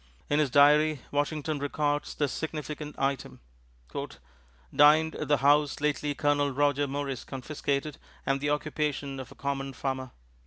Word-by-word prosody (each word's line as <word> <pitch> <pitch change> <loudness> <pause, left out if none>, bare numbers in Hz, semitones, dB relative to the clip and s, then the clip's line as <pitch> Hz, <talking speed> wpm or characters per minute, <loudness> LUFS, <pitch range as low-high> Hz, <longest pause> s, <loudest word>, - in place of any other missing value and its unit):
In 145 - +3
his 150 -3 +2
diary, 150 +2 +5
Washington 150 +1 -1
records 145 +1 -1
this 145 -2 0
significant 150 -1 -5
item: 135 -1 -2 1.4
"Dined 155 +2 +6
at 150 - -4
the 145 0 +4
house 145 +1 +3
lately 150 0 0
Colonel 145 +2 +2
Roger 145 +1 +1
Morris 140 -2 -3
confiscated 140 +2 -3 0.3
and 135 0 0
the 145 - 0
occupation 145 -2 -2
of 130 - -8
a - - -13
common 135 -1 -3
Farmer." 130 -1 -3
145 Hz, 140 wpm, -28 LUFS, 140-150 Hz, 1.4 s, Dined